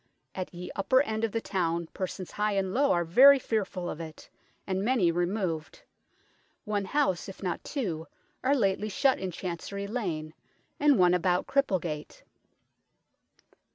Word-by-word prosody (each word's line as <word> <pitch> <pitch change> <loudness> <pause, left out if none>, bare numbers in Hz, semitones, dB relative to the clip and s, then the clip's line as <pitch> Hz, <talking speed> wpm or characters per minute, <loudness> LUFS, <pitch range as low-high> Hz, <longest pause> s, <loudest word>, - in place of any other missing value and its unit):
At 185 -1 -5
ye 180 0 -7
upper 260 +7 +3
end 220 -4 -3
of 225 - +1
the 225 - -1
towne 170 -4 -1
persons 185 -1 -5
high 210 0 0
and 190 -1 -1
low 280 +4 +3
are 175 -1 +2
very 270 +12 +8
fearfull 200 -7 -2
of 155 - -5
it, 160 -1 -10 0.4
and 190 0 -1
many 215 -7 +3
removed; 175 -2 -2 0.8
one 205 -2 -1
house, 190 - 0
if 195 - -10
not 180 -3 -2
two, 175 - -3 0.4
are 270 +2 +3
lately 205 -3 +1
shut 265 +6 +2
in 190 - -3
Chancery 185 +3 -5
Lane, 175 -9 -3 0.5
and 290 -3 +5
one 180 -1 +5
about 180 0 +1
Cripplegate." 180 - -1
190 Hz, 150 wpm, -29 LUFS, 175-220 Hz, 0.8 s, very